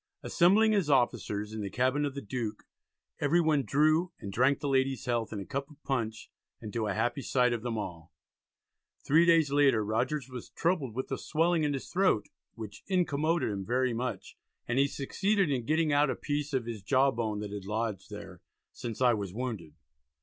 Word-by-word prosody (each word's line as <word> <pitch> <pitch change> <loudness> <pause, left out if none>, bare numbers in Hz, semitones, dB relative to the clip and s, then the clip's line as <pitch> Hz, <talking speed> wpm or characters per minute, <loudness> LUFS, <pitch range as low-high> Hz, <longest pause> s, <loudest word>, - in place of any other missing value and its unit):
Assembling 200 +5 +4
his 195 -8 +1
officers 110 -5 +1
in 110 - -4
the 100 - -3
cabin 130 +7 +1
of 140 -1 -4
the 140 - -5
Duke 110 -1 -4 0.6
"every 150 +4 +3
one 155 -4 +3
drew, 155 +6 +2
and 100 -1 -7
drank 130 +5 +3
the 145 - -3
lady's 135 -2 +1
health 120 -2 -1
in 105 - -4
a 100 - -6
cup 140 0 -4
of 150 -1 -19
Punch, 115 -5 -3 0.3
and 105 - -8
to 115 -2 -1
a 100 - -1
happy 130 +7 0
sight 125 -2 +2
of 115 - -3
them 115 -1 -3
all." 85 -5 -6 0.9
Three 165 +4 +5
days 165 -4 +4
later 135 -7 +4
Rogers 130 +6 -1
was 125 -2 -8
troubled 160 -10 -1
with 130 +2 -4
a 135 - -2
swelling 165 +1 +1
in 145 -1 +1
his 135 - -5
throat 180 - +2 0.3
"which 110 -3 -9
incommoded" 165 - +1
him 100 -1 -3
very 125 +4 +1
much, 125 +2 -4 0.3
and 120 +2 +1
he 140 - +4
succeeded 190 +6 0
in 125 -4 -2
getting 155 -1 +2
out 145 0 +4
a - - 0
piece 145 0 -3
of 130 -4 -1
his 115 -3 -5
jaw 135 +6 +3
bone 110 -4 -2
that 105 -1 -5
had 100 -2 -6
lodged 105 -2 -3
there - - -9 0.3
"since 115 0 -6
I 125 -2 +5
was 100 -3 -4
wounded." 110 -11 -5
130 Hz, 200 wpm, -30 LUFS, 110-150 Hz, 0.9 s, Three